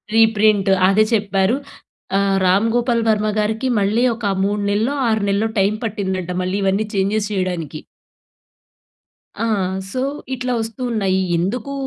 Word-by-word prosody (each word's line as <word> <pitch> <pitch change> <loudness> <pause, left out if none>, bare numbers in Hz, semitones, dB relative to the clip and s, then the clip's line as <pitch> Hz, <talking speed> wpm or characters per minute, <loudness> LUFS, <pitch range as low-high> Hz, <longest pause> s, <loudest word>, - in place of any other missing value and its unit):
Reprint 215 -3 +4 0.2
అదే 205 +2 +4
చెప్పారు. 200 0 +1 0.6
ఆహ్, 195 -1 +2
'రామ్ 190 +4 +3
గోపాల్ 240 -1 +1
వర్మ' 215 0 +1
గారికి 220 +4 -1
మళ్ళీ 210 +4 +1
ఒక 225 -1 -7 0.2
3 205 +1 0
నెల్లో 225 +7 0
6 220 -2 +1
నెల్లో 205 +3 +1
టైం 195 +2 +2
పట్టిందంట. 190 -4 -3
మళ్ళీ 185 +2 -1
ఇవన్నీ 195 +2 +1
చేంజెస్ 200 +2 0
చేయడానికి. 175 -6 -3 1.6
ఆ! - - +1 0.5
సో, 255 - -2 0.3
ఇట్లా 250 -1 -2
వస్తున్నాయి 220 -4 -1 0.2
ఎందుకు? 220 +10 -2
210 Hz, 125 wpm, -19 LUFS, 195-225 Hz, 1.6 s, Reprint